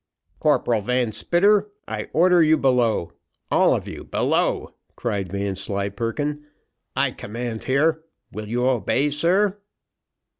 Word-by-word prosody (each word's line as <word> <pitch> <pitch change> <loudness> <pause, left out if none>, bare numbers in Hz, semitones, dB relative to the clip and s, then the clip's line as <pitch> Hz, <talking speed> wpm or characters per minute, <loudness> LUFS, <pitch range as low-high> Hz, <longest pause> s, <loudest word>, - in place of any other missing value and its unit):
"Corporal 115 -3 +2
Van 125 +1 0
Spitter, 200 - +2 0.2
I 105 -1 -5
order 180 +1 +4
you 160 0 +5
below 125 - +1 0.4
all - - +4
of - - -4
you - - -7
below," - - 0 0.2
cried 100 -6 -3
Vanslyperken; 100 +8 -3 0.5
"I - - +1
command 115 +1 -6
here 155 +4 +2 0.3
will 105 0 -6
you 120 +3 0
obey, 130 +4 +1
sir?" 185 +7 +1
125 Hz, 115 wpm, -23 LUFS, 105-155 Hz, 0.5 s, you